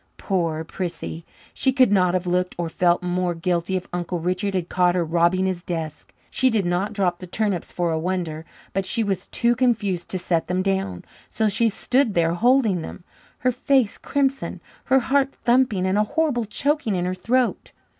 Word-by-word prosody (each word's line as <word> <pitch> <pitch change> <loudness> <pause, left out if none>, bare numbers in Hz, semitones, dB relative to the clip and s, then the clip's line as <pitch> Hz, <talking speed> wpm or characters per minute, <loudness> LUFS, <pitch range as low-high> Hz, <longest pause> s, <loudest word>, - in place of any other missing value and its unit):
Poor 165 -5 -1
Prissy! 170 -1 -5 0.3
She 265 - +1
could 255 -5 +4
not 185 -3 +3
have 185 0 -1
looked 180 +1 0
or 170 -1 -2
felt 175 +1 +2
more 180 0 -1
guilty 175 +2 -1
if 185 - -3
Uncle 175 0 -2
Richard 185 +3 -1
had 180 -2 -1
caught 180 -1 +2
her 175 -2 +1
robbing 170 +3 +2
his 185 -2 -1
desk. 165 -4 -5 0.2
She 260 - +3
did 215 -5 +1
not 180 +5 0
drop 180 -4 0
the 185 - -8
turnips 200 -2 -2
for 175 -1 -1
a 160 - 0
wonder; 170 -2 -2 0.3
but 195 0 -1
she 230 +2 +1
was 195 -3 -2
too 235 0 +1
confused 220 -8 0
to 185 - -1
set 175 -2 -1
them 185 +1 0
down, 190 - -2 0.2
so 220 - 0
she 225 +3 +2
stood 250 +2 +1
there 165 -1 +2
holding 225 -2 +3
them, 165 - -8 0.4
her 255 - +3
face 255 -2 +1
crimson, 275 -1 -1 0.3
her 265 0 +4
heart 275 +2 +1
thumping, 240 -6 +2
and 190 +2 +2
a - - +4
horrible 290 -1 0
choking 280 0 0
in 175 -1 -1
her 180 - -1
throat. 245 +7 0
185 Hz, 190 wpm, -23 LUFS, 175-230 Hz, 0.4 s, could